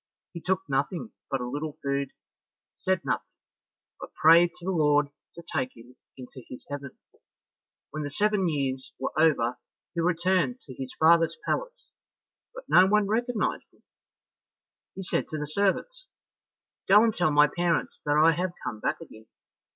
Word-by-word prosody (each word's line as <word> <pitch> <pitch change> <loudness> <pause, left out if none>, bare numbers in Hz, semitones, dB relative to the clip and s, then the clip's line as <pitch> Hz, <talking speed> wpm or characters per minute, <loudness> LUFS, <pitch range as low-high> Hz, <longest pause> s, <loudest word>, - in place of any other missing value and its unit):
He 170 - -7
took 185 +1 0
nothing 145 - -2 0.2
but 135 -3 -1
a 125 - -3
little 145 +3 -5
food, 140 -1 -1 0.7
said 185 -2 -1
nothing, - - -2 0.7
but - - -10
prayed 170 +2 +6
to 175 - -12
the 190 - 0
Lord 150 -4 +3 0.3
to 170 - -10
take 130 -6 -3
him 120 +2 -15 0.2
into 130 0 -10
his 125 - -10
heaven. 140 -2 -6 0.9
When 155 - -4
the 145 - -3
seven 200 +3 +1
years 135 -3 -3
were 130 - -4
over, 135 -7 +2 0.3
he 170 - -1
returned 180 +7 +1
to 130 - -11
his 130 0 -7
father's 165 - +4
palace, - - -3 0.6
but - - -11
no 185 +1 +6
one 210 +1 +3
recognized 235 +2 -1
him. - - -30 1.1
He 190 - -6
said 180 - -1
to 155 - -5
the 150 - -3
servants, 205 - -1 0.8
"Go 205 +3 +7
and 225 -1 +2
tell 175 -4 +1
my 150 0 +6
parents 175 +2 -1
that 145 0 +1
I 160 +2 +6
have 175 +2 -2
come 110 - -4
back 110 - -2
again." 110 -9 -13
165 Hz, 160 wpm, -27 LUFS, 140-190 Hz, 1.1 s, Go